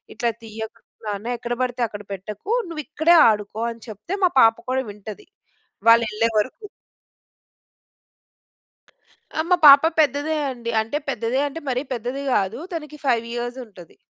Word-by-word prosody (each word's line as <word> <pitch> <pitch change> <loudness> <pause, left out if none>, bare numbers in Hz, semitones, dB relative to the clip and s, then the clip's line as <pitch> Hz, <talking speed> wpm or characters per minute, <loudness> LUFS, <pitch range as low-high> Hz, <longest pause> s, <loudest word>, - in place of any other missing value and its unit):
ఇట్లా 235 -3 0
తీయకు 220 +1 -8 0.3
నాన్న 210 +2 -4
ఎక్కడ 240 +1 -4
పడితే 245 -1 -3
అక్కడ 205 0 -9
పెట్టకు. 210 - -7 0.2
నువ్వు 320 -3 -5
ఇక్కడే 315 +3 +3
ఆడుకో 210 0 -2
అని 230 -1 -12
చెప్తే 215 - -7
మా - - +4
పాప 225 0 +6 0.2
కూడా 260 0 0
వింటది 205 0 -10 0.6
వాళ్ళెళ్ళే 230 -1 +4
వరకు. 260 - -2 2.7
ఆ! - - -3
మా 360 - +6
పాప 280 +1 +10 0.2
పెద్దదే 295 +1 +2
అండి. 235 -2 -5
అంటే 225 +7 -3
పెద్దదే 250 0 -1
అంటే 305 +3 -7
మరీ 255 +1 -1
పెద్దది 245 +4 -4
గాదు. 205 +3 0
తనకి 300 -2 -6
5 235 -3 +2
ఇయర్స్ 240 +1 -4
ఉంటది. 180 -6 -16
235 Hz, 140 wpm, -22 LUFS, 215-275 Hz, 2.7 s, పాప